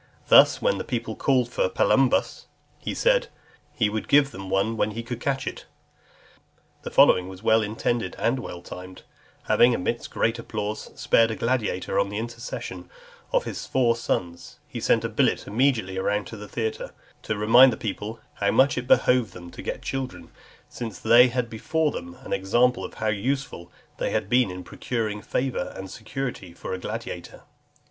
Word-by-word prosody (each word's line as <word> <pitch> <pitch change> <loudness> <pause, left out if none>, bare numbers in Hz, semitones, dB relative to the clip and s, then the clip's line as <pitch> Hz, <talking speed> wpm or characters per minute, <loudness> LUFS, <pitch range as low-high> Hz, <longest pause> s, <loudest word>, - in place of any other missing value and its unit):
Thus, - - +7
when - - +2
the - - -3
people 115 -4 -3
called 130 -3 +2
for 120 -6 0
Palumbus, 135 +5 +2 0.3
he - - -4
said, - - +3 0.5
"He 115 -6 +2
would 105 +1 -3
give 140 -1 +4
them 95 -3 -8
one 100 +4 +1
when 110 - +1
he 115 +2 -5
could 120 0 -5
catch 135 +1 -1
it." - - -6 1.2
The - - -6
following 90 0 +5
was 95 +2 -11
well 110 0 +4
intended, 110 -1 -2
and 120 +3 +1
well 90 -7 -7
timed; 90 0 -10 0.4
having, 120 0 +4
amidst 115 +5 -3
great 115 +1 0
applause, 105 -2 -4
spared 115 0 +4
a 110 - -2
gladiator, 115 -8 -1
on 100 0 +1
the 105 - -4
intercession 115 +1 -6 0.4
of - - +2
his - - -6
four 120 -3 +2
sons, 85 -7 -3
he - - -6
sent - - +2
a - - +1
billet - - +1
immediately 110 -5 +1
round 100 +1 0
the 105 -2 -8
theatre, 110 -1 -4 0.3
to 110 - -3
remind 120 +5 +7
the - - -4
people, 110 +1 -5
"how 100 - 0
much 130 +3 +3
it 125 - -8
behoved 125 -3 +3
them 85 -1 -10
to - - -9
get - - -5
children, 135 -1 -5 0.4
since 115 -6 -6
they 120 +3 +6
had 125 -1 -1
before 150 +8 -1
them 85 -6 -7
an - - -4
example 120 +6 +1
how 110 - -5
useful 110 -2 -2 0.3
they - - -1
had 100 - -1
been 125 -3 +4
in 90 0 -7
procuring 110 -2 -3
favour 125 -6 -2
and 95 -1 -7
security 110 -5 -6
for - - -6
a 95 - -3
gladiator." - - -6
115 Hz, 175 wpm, -25 LUFS, 100-125 Hz, 1.2 s, Thus